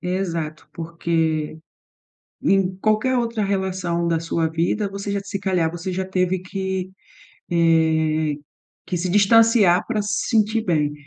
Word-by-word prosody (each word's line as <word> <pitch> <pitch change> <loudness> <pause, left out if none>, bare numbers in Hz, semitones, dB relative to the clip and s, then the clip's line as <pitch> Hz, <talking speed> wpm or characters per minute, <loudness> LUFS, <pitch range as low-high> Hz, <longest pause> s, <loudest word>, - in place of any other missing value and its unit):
Exato, 170 -4 -3
porque 165 -2 -2 0.8
em 190 -1 +2
qualquer 215 +5 +1
outra 230 -2 -1
relação 190 -3 -1
da 165 -1 +1
sua 165 0 -1
vida, 170 +6 -1
você 200 +1 -5
já, 200 - 0
se 200 0 -5
calhar, 180 -5 +1
você 175 +3 -5
já 190 +1 -2
teve 185 0 0
que, 190 0 -4 0.6
eh, 160 -2 +2 0.5
que - - -3
se 180 +2 -2
distanciar 205 -1 +5
para 220 -3 0
se 205 - -2
sentir 220 0 +2
bem 150 -4 +1
185 Hz, 135 wpm, -22 LUFS, 165-200 Hz, 0.8 s, distanciar